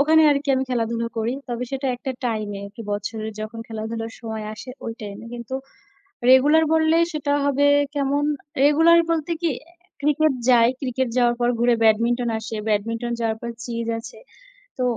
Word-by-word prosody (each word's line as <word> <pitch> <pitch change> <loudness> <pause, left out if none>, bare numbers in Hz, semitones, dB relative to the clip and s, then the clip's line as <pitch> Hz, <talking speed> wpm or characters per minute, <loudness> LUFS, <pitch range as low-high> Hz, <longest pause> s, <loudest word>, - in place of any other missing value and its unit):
ওখানে 315 +2 +5
আরকি 285 0 0
আমি 265 - 0
খেলাধুলা 230 -1 -1
করি। 225 +2 0 0.2
তবে 245 0 -3
সেটা 270 0 -2
একটা 265 +2 -5
time 215 -3 -1
এ, - - -7
একটু 205 +3 -13
বছরের 215 +2 -4
যখন 215 +2 -6
খেলাধুলার 225 +1 -5
সময় 220 -2 -5
আসে 215 +4 -10 0.2
ওই 230 - -3
time 205 -2 -7
এ। - - -10
কিন্তু 240 +2 -6 0.8
regular 290 +5 +6
বললেই 320 +1 +4
সেটা 295 -2 -2
হবে 285 0 +2 0.3
কেমন? 285 0 +1 0.4
regular 325 +4 +6
বলতে 325 0 -1
কি 340 - +2 0.5
cricket 300 +1 +3 0.2
যায়, 235 -2 +6
cricket 260 -1 -1
যাওয়ার 240 -1 +3
পর 240 0 +2
ঘুরে 240 +1 +4
badminton 235 +2 +3
আসে, 220 0 -6
badminton 230 +3 -1
যাওয়ার 225 -1 -1
পর 235 - -4 0.2
চেজ 230 -1 -4
আছে। 230 - -11 0.6
তো - - +1
240 Hz, 170 wpm, -23 LUFS, 225-285 Hz, 0.8 s, regular